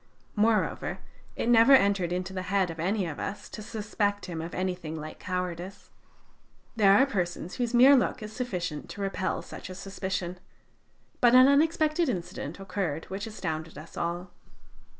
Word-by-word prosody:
Moreover, 215 Hz, 0 st, +1 dB, 0.4 s
it -, -, -2 dB
never 235 Hz, +3 st, +7 dB
entered 200 Hz, -7 st, +4 dB
into 180 Hz, +1 st, -3 dB
the 185 Hz, -, -3 dB
head 195 Hz, -3 st, +2 dB
of 165 Hz, -, -10 dB
any 190 Hz, +4 st, 0 dB
of 160 Hz, -4 st, -5 dB
us 205 Hz, -, -5 dB
to -, -, -8 dB
suspect 205 Hz, -1 st, -2 dB
him 170 Hz, -3 st, -5 dB
of 165 Hz, +1 st, -6 dB
anything 180 Hz, -4 st, -3 dB
like 155 Hz, +1 st, -8 dB
cowardice. 180 Hz, +1 st, -5 dB, 0.8 s
There 200 Hz, -3 st, +6 dB
are 270 Hz, -, +6 dB
persons 180 Hz, -7 st, -3 dB
whose 245 Hz, -1 st, -1 dB
mere 260 Hz, +4 st, +8 dB
look 250 Hz, -2 st, +1 dB
is 215 Hz, 0 st, -7 dB
sufficient 180 Hz, -, -4 dB
to 205 Hz, -, -7 dB
repel 195 Hz, -1 st, -2 dB
such -, -, -9 dB
a 185 Hz, -, -7 dB
suspicion. 190 Hz, -2 st, -4 dB, 0.8 s
But 245 Hz, 0 st, +5 dB
an 255 Hz, +1 st, +9 dB
unexpected 310 Hz, +2 st, +3 dB
incident 170 Hz, -, -4 dB
occurred 185 Hz, -5 st, -3 dB
which 200 Hz, +3 st, -4 dB
astounded 160 Hz, -7 st, -5 dB
us 155 Hz, +2 st, -11 dB
all. 175 Hz, +1 st, -3 dB
195 Hz, 160 wpm, -28 LUFS, 175-225 Hz, 0.8 s, an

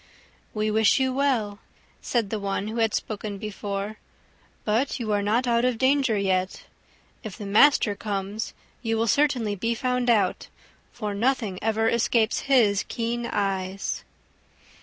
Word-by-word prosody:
"We 215 Hz, 0 st, 0 dB
wish 220 Hz, +3 st, +4 dB
you 260 Hz, -1 st, +1 dB
well," 245 Hz, -7 st, 0 dB, 0.4 s
said 230 Hz, -5 st, -1 dB
the 220 Hz, -, -1 dB
one 200 Hz, +1 st, -2 dB
who 225 Hz, -, -5 dB
had 225 Hz, -2 st, +2 dB
spoken 210 Hz, -1 st, -4 dB
before, 205 Hz, 0 st, -5 dB, 0.7 s
"but 235 Hz, +7 st, 0 dB
you 220 Hz, -3 st, -2 dB
are 205 Hz, -1 st, +2 dB
not 220 Hz, +5 st, +1 dB
out 235 Hz, -1 st, +2 dB
of 250 Hz, -2 st, +1 dB
danger 265 Hz, -3 st, +2 dB
yet. 185 Hz, -1 st, -1 dB, 0.6 s
If 215 Hz, -5 st, -7 dB
the 205 Hz, -, -7 dB
master 210 Hz, +2 st, +5 dB
comes, 200 Hz, +1 st, -4 dB, 0.3 s
you 225 Hz, -2 st, -1 dB
will 225 Hz, -, +1 dB
certainly 240 Hz, -4 st, +2 dB
be 230 Hz, +4 st, -1 dB
found 250 Hz, 0 st, 0 dB
out, 220 Hz, -4 st, +2 dB, 0.4 s
for 210 Hz, -3 st, -4 dB
nothing 220 Hz, -3 st, 0 dB
ever 225 Hz, +1 st, +1 dB
escapes 230 Hz, -1 st, +2 dB
his 215 Hz, -7 st, +4 dB
keen 235 Hz, 0 st, -2 dB
eyes." 195 Hz, -2 st, -2 dB
220 Hz, 145 wpm, -25 LUFS, 205-240 Hz, 0.7 s, master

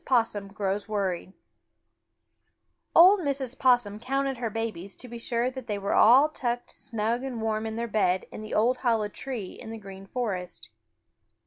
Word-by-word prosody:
POSSUM 225 Hz, -5 st, +1 dB
GROWS 200 Hz, +1 st, -3 dB
WORRIED 190 Hz, -3 st, -2 dB, 1.6 s
Old 375 Hz, +5 st, +8 dB
Mrs. 275 Hz, -5 st, -2 dB
Possum 240 Hz, -5 st, +3 dB
counted 270 Hz, +2 st, -1 dB
her 235 Hz, -1 st, -2 dB
babies 215 Hz, -4 st, -4 dB
to 250 Hz, -, -10 dB
be 235 Hz, 0 st, -8 dB
sure 240 Hz, +1 st, -1 dB
that 260 Hz, -2 st, -8 dB
they 210 Hz, -, -1 dB
all 220 Hz, +6 st, +6 dB
were 310 Hz, -, -20 dB
tucked 240 Hz, -3 st, -3 dB
snug 230 Hz, 0 st, -2 dB
and 260 Hz, -4 st, -4 dB
warm 220 Hz, 0 st, -1 dB
in 220 Hz, -, -4 dB
their 235 Hz, +1 st, -2 dB
bed 190 Hz, -4 st, +1 dB
in -, -, -7 dB
the 215 Hz, -, -5 dB
old 240 Hz, +4 st, +3 dB
hollow 225 Hz, -5 st, +1 dB
tree 230 Hz, -4 st, -6 dB
in 225 Hz, -, -10 dB
the 225 Hz, -, -6 dB
Green 195 Hz, -2 st, -11 dB
Forest. 185 Hz, -, -4 dB
225 Hz, 165 wpm, -27 LUFS, 205-250 Hz, 1.6 s, Old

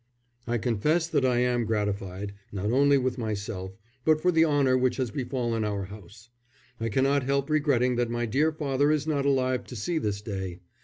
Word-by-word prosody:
I 120 Hz, 0 st, +1 dB
confess 130 Hz, +9 st, +1 dB
that 145 Hz, -5 st, +1 dB
I 125 Hz, -2 st, +2 dB
am 125 Hz, -1 st, +1 dB
gratified, 100 Hz, -2 st, -2 dB, 0.2 s
not 100 Hz, +2 st, -2 dB
only 140 Hz, +2 st, +4 dB
for 130 Hz, -1 st, -1 dB
myself, 100 Hz, -3 st, -4 dB, 0.3 s
but 155 Hz, +1 st, +4 dB
for 180 Hz, +3 st, +2 dB
the 165 Hz, -1 st, +4 dB
honour 145 Hz, -4 st, +3 dB
which 125 Hz, -1 st, +1 dB
has 130 Hz, -4 st, -1 dB
befallen 120 Hz, -3 st, -2 dB
our 100 Hz, -2 st, -2 dB
house. 105 Hz, +3 st, -12 dB, 0.5 s
I 115 Hz, 0 st, -1 dB
cannot 135 Hz, +5 st, +2 dB
help 140 Hz, +2 st, -1 dB
regretting 130 Hz, -5 st, +2 dB
that 120 Hz, -1 st, +1 dB
my 120 Hz, 0 st, -1 dB
dear 140 Hz, +8 st, +2 dB
father 145 Hz, -1 st, +1 dB
is 150 Hz, -1 st, +1 dB
not 145 Hz, -3 st, 0 dB
alive 130 Hz, -2 st, +1 dB
to 125 Hz, -, -9 dB
see 160 Hz, -, -1 dB
this 105 Hz, -6 st, -3 dB
day. 95 Hz, -4 st, -4 dB
125 Hz, 190 wpm, -27 LUFS, 105-140 Hz, 0.5 s, only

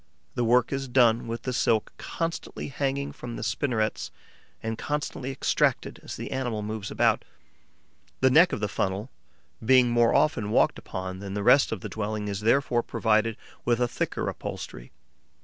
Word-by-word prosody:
The 120 Hz, -, -1 dB
work 120 Hz, +2 st, +3 dB
is 135 Hz, 0 st, -2 dB
done 120 Hz, -2 st, +3 dB
with 115 Hz, 0 st, -4 dB
the 130 Hz, -, -2 dB
silk 110 Hz, -3 st, +1 dB
constantly 165 Hz, -2 st, -4 dB
hanging 140 Hz, 0 st, -2 dB
from 120 Hz, -1 st, -8 dB
the -, -, -5 dB
spinnerets 110 Hz, -3 st, -1 dB, 0.5 s
and 110 Hz, 0 st, -2 dB
constantly 145 Hz, -1 st, -3 dB
extracted 135 Hz, -, 0 dB
as -, -, -7 dB
the -, -, -6 dB
animal 120 Hz, -5 st, -2 dB
moves 110 Hz, -1 st, -4 dB
about. -, -, +2 dB, 1.0 s
The 130 Hz, 0 st, +4 dB
neck 165 Hz, +6 st, +6 dB
of -, -, -3 dB
the 105 Hz, -, +1 dB
funnel, 100 Hz, +4 st, -2 dB, 0.5 s
being 125 Hz, 0 st, +5 dB
more 120 Hz, -1 st, +4 dB
often 150 Hz, -9 st, +2 dB
walked -, -, +3 dB
upon 95 Hz, 0 st, -6 dB
than 100 Hz, 0 st, -6 dB
the 100 Hz, -, -2 dB
rest 140 Hz, +6 st, +5 dB
of 110 Hz, -5 st, -3 dB
the -, -, -5 dB
dwelling, 105 Hz, -1 st, -3 dB
is 100 Hz, 0 st, -3 dB
therefore 120 Hz, +2 st, +2 dB
provided 110 Hz, -1 st, +1 dB, 0.3 s
with 120 Hz, 0 st, +1 dB
a 125 Hz, -, +2 dB
thicker -, -, -2 dB
upholstery. -, -, -6 dB
115 Hz, 165 wpm, -27 LUFS, 110-130 Hz, 1.0 s, neck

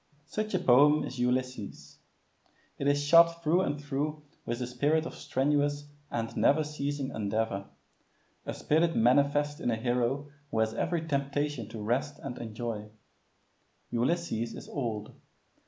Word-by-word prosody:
Such 215 Hz, +4 st, -3 dB
a -, -, +2 dB
poem 145 Hz, +4 st, +5 dB
is 130 Hz, -, -6 dB
Ulysses. 125 Hz, -3 st, -2 dB, 0.8 s
It 140 Hz, -, 0 dB
is 145 Hz, 0 st, +3 dB
shot 170 Hz, +2 st, +6 dB
through 170 Hz, +4 st, +3 dB
and 145 Hz, -5 st, -1 dB
through 145 Hz, +1 st, -3 dB, 0.2 s
with 120 Hz, -, -1 dB
the 125 Hz, -, -2 dB
spirit 145 Hz, +6 st, +1 dB
of -, -, -6 dB
strenuous 145 Hz, +1 st, 0 dB, 0.2 s
and 115 Hz, -1 st, -3 dB
never 155 Hz, +2 st, +4 dB
ceasing 145 Hz, -2 st, -3 dB
endeavor 105 Hz, -1 st, -2 dB, 0.7 s
a -, -, -4 dB
spirit 165 Hz, +2 st, +2 dB
manifest 145 Hz, +5 st, +3 dB
in -, -, 0 dB
a 115 Hz, -, +2 dB
hero 125 Hz, +5 st, -1 dB, 0.2 s
who 145 Hz, -, -3 dB
has 110 Hz, 0 st, +2 dB
every 165 Hz, +7 st, -1 dB
temptation 140 Hz, -4 st, -1 dB
to 110 Hz, -2 st, -6 dB
rest 135 Hz, +6 st, -1 dB
and 130 Hz, -3 st, -7 dB
enjoy. 110 Hz, -1 st, -5 dB, 1.0 s
Ulysses 120 Hz, -3 st, 0 dB
is -, -, -9 dB
old. 110 Hz, -6 st, -3 dB
140 Hz, 140 wpm, -30 LUFS, 120-150 Hz, 1.0 s, shot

